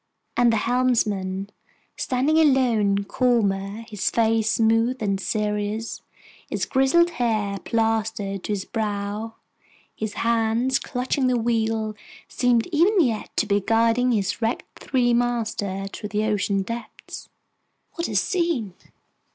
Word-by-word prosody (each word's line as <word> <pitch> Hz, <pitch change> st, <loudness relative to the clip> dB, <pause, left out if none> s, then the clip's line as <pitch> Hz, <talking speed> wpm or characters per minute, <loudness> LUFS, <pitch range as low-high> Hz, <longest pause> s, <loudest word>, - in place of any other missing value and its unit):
And 240 Hz, -1 st, +4 dB
the 225 Hz, -, +2 dB
helmsman, 210 Hz, -5 st, 0 dB, 0.4 s
standing 275 Hz, +5 st, +1 dB
alone, 235 Hz, -9 st, +3 dB
calmer, 205 Hz, -3 st, 0 dB
his 210 Hz, -4 st, -1 dB
face 225 Hz, -1 st, +2 dB
smooth 225 Hz, +3 st, +2 dB
and 195 Hz, -3 st, -1 dB
serious, 210 Hz, +1 st, -2 dB, 0.5 s
his -, -, -1 dB
grizzled 280 Hz, +6 st, +3 dB
hair 215 Hz, -8 st, -1 dB
plastered 220 Hz, -3 st, -1 dB
to -, -, -3 dB
his 195 Hz, -2 st, -3 dB
brow, 210 Hz, 0 st, -3 dB, 0.6 s
his 215 Hz, -1 st, -4 dB
hands 230 Hz, +3 st, +1 dB
clutching 260 Hz, +1 st, -1 dB
the 250 Hz, -1 st, +2 dB
wheel, 225 Hz, -2 st, 0 dB, 0.3 s
seemed 245 Hz, -2 st, +2 dB
even 360 Hz, +6 st, +3 dB
yet 235 Hz, -10 st, +1 dB
to -, -, +3 dB
be 205 Hz, -1 st, +1 dB
guiding 230 Hz, +4 st, +2 dB
his 205 Hz, -1 st, -1 dB
wrecked 225 Hz, +2 st, -3 dB
three 245 Hz, -2 st, +1 dB
master 225 Hz, -5 st, -1 dB
through 210 Hz, -, -6 dB
the 210 Hz, 0 st, -1 dB
ocean 205 Hz, -2 st, 0 dB
depths! 230 Hz, +4 st, -8 dB, 0.6 s
What 335 Hz, -, -3 dB
a -, -, -4 dB
scene! 335 Hz, -, 0 dB
225 Hz, 125 wpm, -24 LUFS, 210-245 Hz, 0.6 s, And